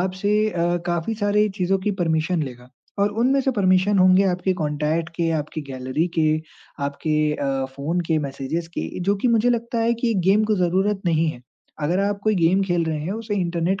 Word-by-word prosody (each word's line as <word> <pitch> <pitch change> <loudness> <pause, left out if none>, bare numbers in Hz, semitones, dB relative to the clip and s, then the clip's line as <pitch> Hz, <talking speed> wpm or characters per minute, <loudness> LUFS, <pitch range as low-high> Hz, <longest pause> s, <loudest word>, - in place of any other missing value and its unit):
आपसे 190 +3 -1 0.2
अ, 175 -1 0
काफ़ी 175 +5 -1
सारे 210 0 +2
चीज़ों 190 +1 +1
की - - +3
परमिशन 160 +1 0
लेगा 125 -3 -8 0.3
और 200 +1 +2
उनमें 270 +3 +3
से 270 - +1
परमिशन 195 -2 +2
होंगे 185 +1 +5
आपके 185 0 +1
कॉन्टैक्ट 155 0 -1
के, 170 -1 0
आपकी 155 0 -3
गैलरी 130 +4 -2
के 155 -1 +4 0.6
आपके 140 +2 -2 0.2
अ, 135 -2 -1
फ़ोन 160 +6 -1
के 160 -1 +2
मैसेजेज़ 140 +5 -4
के - - -2
जो 200 +3 +1
कि 250 - +3
मुझे 235 +1 +3
लगता 235 0 -1
है 230 +1 +2
कि 235 +1 -2
ये 230 - +1
गेम 210 +2 +4
को 215 0 +1
ज़रूरत 190 +3 +1
नहीं 165 -1 +2
है। 125 - -10 0.4
अगर 170 +5 +1
आप 200 0 -1
कोई 215 0 +2
गेम 180 +2 +3
खेल 175 -3 0
रहे 160 -1 -2
हैं, 180 - -2
उसे 220 -1 -4
इंटरनेट 175 0 -1
180 Hz, 200 wpm, -22 LUFS, 160-205 Hz, 0.6 s, होंगे